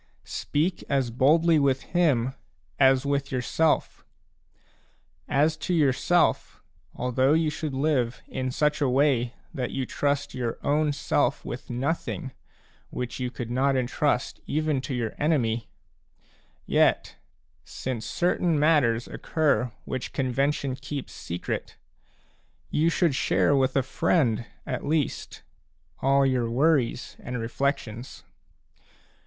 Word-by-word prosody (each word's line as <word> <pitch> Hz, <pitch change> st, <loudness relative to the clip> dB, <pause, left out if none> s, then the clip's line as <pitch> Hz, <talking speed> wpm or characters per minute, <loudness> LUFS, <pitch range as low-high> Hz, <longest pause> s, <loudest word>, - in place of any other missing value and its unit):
Speak 165 Hz, +5 st, -1 dB
as 135 Hz, -4 st, +1 dB
boldly 155 Hz, +6 st, +4 dB
with 135 Hz, -2 st, +1 dB
him 140 Hz, -8 st, +1 dB, 0.5 s
as 135 Hz, 0 st, +5 dB
with 140 Hz, -1 st, -1 dB
yourself. 135 Hz, +5 st, 0 dB, 1.2 s
As 150 Hz, +3 st, +2 dB
to 175 Hz, +4 st, -1 dB
yourself, 155 Hz, +4 st, +2 dB, 0.4 s
although 130 Hz, +3 st, +2 dB
you 160 Hz, -1 st, +2 dB
should 150 Hz, -2 st, -4 dB
live 130 Hz, -4 st, 0 dB
in 130 Hz, 0 st, -3 dB
such 150 Hz, +3 st, 0 dB
a 140 Hz, -, +3 dB
way 130 Hz, -2 st, +2 dB, 0.2 s
that 125 Hz, -2 st, -2 dB
you 135 Hz, -, -2 dB
trust 145 Hz, +2 st, -1 dB
your 120 Hz, -2 st, -3 dB
own 150 Hz, +1 st, +2 dB
self 140 Hz, -, 0 dB
with -, -, -7 dB
nothing 135 Hz, +1 st, -2 dB, 0.6 s
which 125 Hz, 0 st, -5 dB
you 125 Hz, -1 st, -1 dB
could 120 Hz, -2 st, -6 dB
not 135 Hz, +2 st, +2 dB
entrust 130 Hz, +1 st, 0 dB
even 155 Hz, -2 st, 0 dB
to 130 Hz, 0 st, -4 dB
your 115 Hz, -3 st, -2 dB
enemy, 120 Hz, -7 st, +1 dB, 1.0 s
yet, -, -, +2 dB, 0.5 s
since 125 Hz, -4 st, -5 dB
certain 175 Hz, +3 st, +1 dB
matters 145 Hz, -7 st, +3 dB
occur 145 Hz, -6 st, 0 dB
which 130 Hz, -2 st, -4 dB
convention 135 Hz, +1 st, 0 dB
keeps 140 Hz, 0 st, -6 dB
secret, 85 Hz, +1 st, -5 dB, 0.9 s
you 160 Hz, +2 st, +3 dB
should 170 Hz, -2 st, +2 dB
share 140 Hz, +2 st, +2 dB
with 130 Hz, -1 st, +2 dB
a 135 Hz, -, +3 dB
friend 120 Hz, -4 st, +1 dB, 0.2 s
at 125 Hz, -, -3 dB
least 150 Hz, -1 st, -2 dB, 0.6 s
all 135 Hz, +1 st, +4 dB
your 125 Hz, -3 st, +1 dB
worries 130 Hz, -1 st, +1 dB
and 125 Hz, -1 st, -5 dB
reflections. 120 Hz, 0 st, -3 dB
135 Hz, 120 wpm, -26 LUFS, 125-150 Hz, 1.2 s, as